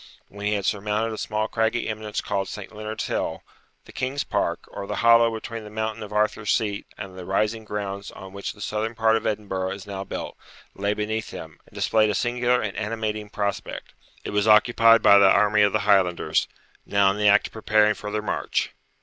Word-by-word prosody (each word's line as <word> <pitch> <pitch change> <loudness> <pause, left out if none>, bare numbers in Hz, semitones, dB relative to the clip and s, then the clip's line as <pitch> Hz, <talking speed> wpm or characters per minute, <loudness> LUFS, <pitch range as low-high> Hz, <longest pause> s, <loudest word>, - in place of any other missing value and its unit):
When 100 +1 -5
he 105 - +1
had 100 -2 -1
surmounted 105 +2 -1
a - - -6
small 110 0 -1
craggy 115 +1 0
eminence 110 -1 -3
called 100 -1 -2
St. 105 +1 -8
Leonard's 110 +1 -4
Hill, - - -3 0.4
the - - -13
King's 135 +2 -2
Park, - - -1
or 100 -1 -6
the - - -3
hollow 115 0 +6
between 115 0 -6
the 105 - -9
mountain 110 +1 -3
of 105 -1 -7
Arthur's 105 0 0
Seat 105 -3 -1
and 95 -2 -8
the - - -7
rising 110 +4 -1
grounds 100 -1 -4
on 95 0 -11
which 100 0 -5
the 105 - -15
southern 110 +2 -2
part 110 -1 +3
of 115 - -1
Edinburgh 95 -3 -2
is 100 -1 -9
now 100 -1 -5
built, - - -6 0.4
lay 100 +1 -1
beneath 110 +1 -3
him, 80 -1 -9
and - - -21
displayed 110 -1 +2
a 105 - 0
singular 125 +1 +1
and 105 -3 -4
animating 110 -1 -3
prospect. 100 -1 -4 0.3
It - - -5
was 105 +1 +1
occupied 115 +1 +6
by 100 - +8
the 100 -1 +7
army 105 +2 +4
of 105 -1 +4
the 110 - +1
Highlanders, 95 -4 +2 0.4
now 100 -1 +3
in 100 - -4
the 105 - +3
act 105 0 +5
of - - -30
preparing 110 -1 +3
for 105 - -7
their 105 0 -2
march. - - -1
105 Hz, 210 wpm, -24 LUFS, 100-110 Hz, 0.4 s, by